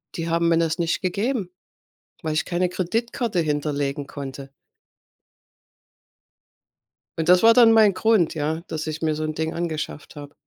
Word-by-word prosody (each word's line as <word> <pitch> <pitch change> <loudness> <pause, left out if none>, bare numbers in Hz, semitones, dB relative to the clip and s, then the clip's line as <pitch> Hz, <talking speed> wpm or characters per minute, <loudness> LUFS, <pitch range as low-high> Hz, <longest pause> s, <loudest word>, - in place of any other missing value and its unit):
Die 165 -1 -3
haben 170 0 +1
mir 165 - +3
das 165 +1 0
nicht 170 -1 -1
gegeben, 200 +2 -2 0.7
weil 155 -2 -2
ich 155 - 0
keine 180 +1 0
Kreditkarte 225 +4 -2
hinterlegen 145 -2 -2
konnte. 135 -1 -8 2.7
Und 160 - -1
das 180 +2 +5
war 230 0 +8
dann 230 -1 +6
mein 215 -3 +5
Grund, 185 -3 +2
ja, 160 +1 -2
dass 160 0 -4
ich 155 0 -5
mir 160 -1 +1
so 155 +1 -3
'n 155 - -3
Ding 160 +1 -3
angeschafft 155 -3 -5
habe. 145 0 -10
165 Hz, 155 wpm, -23 LUFS, 155-185 Hz, 2.7 s, war